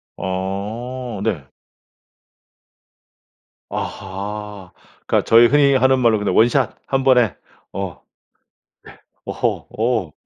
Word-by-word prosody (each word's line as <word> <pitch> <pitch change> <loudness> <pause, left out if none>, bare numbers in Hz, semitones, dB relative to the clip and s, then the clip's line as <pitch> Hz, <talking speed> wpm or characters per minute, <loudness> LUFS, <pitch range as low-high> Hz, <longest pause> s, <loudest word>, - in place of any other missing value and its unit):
어 105 +6 -4
네. 90 -12 -2 2.2
아하. 100 0 -6 0.3
그러니까 - - +1
저희 115 +1 +7
흔히 140 +1 +4
하는 130 0 +4
말로 115 -3 +3
그냥 105 - -1
원 115 - +6
샷. 135 +1 0
1 135 0 0
번에. 125 - +4 0.4
어. 95 -4 -5
예. - - -44 1.2
어허. - - -2
어. 110 -8 0
110 Hz, 160 characters per minute, -20 LUFS, 95-125 Hz, 2.2 s, 저희